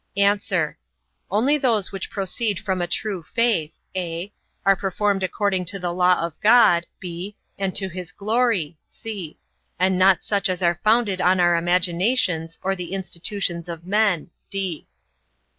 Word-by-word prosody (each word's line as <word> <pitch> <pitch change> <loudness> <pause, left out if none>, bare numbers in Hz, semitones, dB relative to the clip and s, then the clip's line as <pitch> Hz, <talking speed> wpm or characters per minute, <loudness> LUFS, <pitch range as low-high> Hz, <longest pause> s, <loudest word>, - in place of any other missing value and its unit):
A. 200 +1 +5 0.9
Only 255 +10 +2
those 225 -7 +1
which 195 -1 -5
proceed 200 +1 -2
from 190 -4 -2
a 175 - -1
true 200 -3 -2
faith, 205 -4 0 0.2
(a) 175 +1 -3 0.3
are 195 0 +6
performed 195 +1 0
according 190 0 0
to 190 +3 -1
the 175 -2 -3
law 180 0 +3
of 170 -2 -9
God, 210 -7 +5
(b) 180 +3 -6 0.2
and 195 -2 -1
to 190 - 0
his 180 -2 -7
glory; 205 -7 0
(c) 200 -8 -7 0.4
and 185 +1 +2
not 190 0 +5
such 200 -3 0
as 185 0 -2
are 170 0 +2
founded 215 -4 +3
on 185 +1 +3
our 175 -1 +4
imaginations, 175 0 +1
or 195 +1 0
the 180 0 -6
institutions 180 -2 -3
of 170 0 -7
men. 195 -4 +1
190 Hz, 145 wpm, -23 LUFS, 175-205 Hz, 0.9 s, are